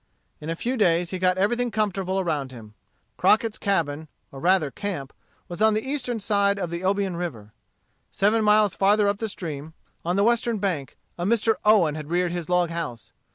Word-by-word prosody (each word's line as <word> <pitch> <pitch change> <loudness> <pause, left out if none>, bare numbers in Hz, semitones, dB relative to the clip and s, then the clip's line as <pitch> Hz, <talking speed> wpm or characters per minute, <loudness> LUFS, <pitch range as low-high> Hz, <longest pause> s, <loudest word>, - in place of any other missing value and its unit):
In 150 - -7
a 165 - -1
few 250 +9 -2
days 175 -4 +2
he 185 - -3
got 185 0 +2
everything 240 +5 +1
comfortable 195 -3 -1
around 150 -7 -2
him. 110 -4 -12 0.4
Crockett's 220 0 +2
cabin, 160 -6 -1 0.2
or 135 - -9
rather 175 -3 +2
camp, 180 -10 -5 0.3
was 175 +3 -7
on 220 0 +4
the 220 +4 -2
eastern 250 -4 -2
side 200 -1 +1
of 180 -4 -3
the 170 0 -4
Obion 195 -1 0
River. 115 -12 -6 0.6
Seven 215 +3 +2
miles 210 -1 +4
farther 205 +1 +3
up 200 0 0
the 225 - -2
stream, 160 -4 -7 0.3
on 175 +2 -1
the 200 - +3
western 235 0 +2
bank, 180 -9 -3 0.2
a - - -2
Mr. 225 +3 +2
Owen 205 -8 +4
had 155 -1 -7
reared 175 0 +1
his 175 -1 -5
log 180 -1 +2
house. 165 -10 -5
185 Hz, 190 wpm, -24 LUFS, 165-210 Hz, 0.6 s, on